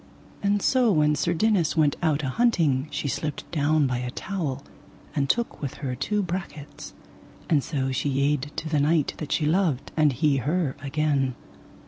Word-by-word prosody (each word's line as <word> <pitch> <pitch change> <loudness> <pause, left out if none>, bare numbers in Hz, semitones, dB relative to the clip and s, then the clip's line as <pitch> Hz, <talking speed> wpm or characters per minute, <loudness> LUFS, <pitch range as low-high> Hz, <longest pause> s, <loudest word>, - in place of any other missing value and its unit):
And 200 0 +1
so 255 -4 +3
when 150 -4 +3
Sir 150 +4 0
Dinas 180 -5 +2
went 150 -3 +3
out 155 -3 +1
a 135 - -1
hunting 155 - +2
she 145 - -3
slipped 145 +3 -3
down 155 -1 +2
by 125 -2 -1
a 125 0 -3
towel, 140 -3 -4 0.5
and 140 -2 0
took 235 0 0
with 140 -3 -4
her 135 -4 -4
two 205 - -1
brachets, 170 -5 -6 0.6
and 145 -4 +4
so 135 -4 -2
she 135 +2 -1
yede 140 +1 0
to 160 - -4
the 155 -2 +1
knight 150 +1 +2
that 150 - -5
she 155 - +1
loved, 155 -4 +1
and 150 -3 +3
he 145 +1 +2
her 150 +1 0
again. 140 -2 0
150 Hz, 175 wpm, -25 LUFS, 140-170 Hz, 0.6 s, and